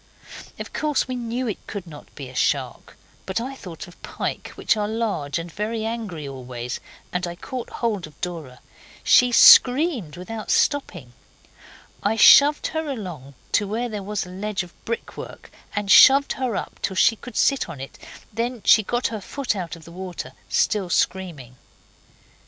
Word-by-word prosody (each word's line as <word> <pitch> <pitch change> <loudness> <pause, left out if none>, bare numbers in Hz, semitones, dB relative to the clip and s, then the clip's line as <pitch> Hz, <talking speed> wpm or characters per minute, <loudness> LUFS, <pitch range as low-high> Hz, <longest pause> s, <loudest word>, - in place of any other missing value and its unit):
Of - - -8
course 300 -4 0
we 255 - -4
knew 240 +1 -3
it 215 - -5
could 200 -3 -6
not 150 -4 -13
be 140 -3 -7
a 130 - -12
shark, - - -1 0.3
but 190 +3 -1
I 255 +4 -5
thought 180 - -9
of 175 - -17
pike, - - -4
which - - +1
are 210 -1 -1
large 210 -11 -2
and 170 0 -6
very 220 +4 -3
angry 215 -10 -4
always, 125 -2 -6 0.3
and 180 0 -1
I 175 - -6
caught 250 +7 -6
hold 210 -8 -2
of 150 - -19
Dora. 160 -8 -6 0.4
She 250 0 +5
screamed 250 - +6
without 215 +4 -7
stopping. 205 - 0 0.9
I 205 +2 +1
shoved 290 +6 +7
her 315 -1 -2
along 175 - -7 0.2
to 205 - +2
where 235 +4 -2
there 210 -2 -5
was 205 0 -3
a - - -11
ledge 195 +1 -3
of 175 - -14
brickwork, 230 0 -6 0.2
and 205 -1 -1
shoved 275 +5 +8
her 255 -5 -2
up, - - -5
till 190 - -2
she 225 - +4
could 245 +3 -10
sit 275 -9 +2
on 155 -5 -8
it, 135 - -9 0.3
then 235 +1 -3
she 220 - +7
got 240 +4 -2
her 220 -2 -5
foot 270 +3 -3
out 175 -3 -5
of 165 -2 -15
the 170 - -12
water, 180 0 -7 0.2
still 200 -4 +1
screaming. 160 -10 -2
205 Hz, 175 wpm, -23 LUFS, 170-235 Hz, 0.9 s, shoved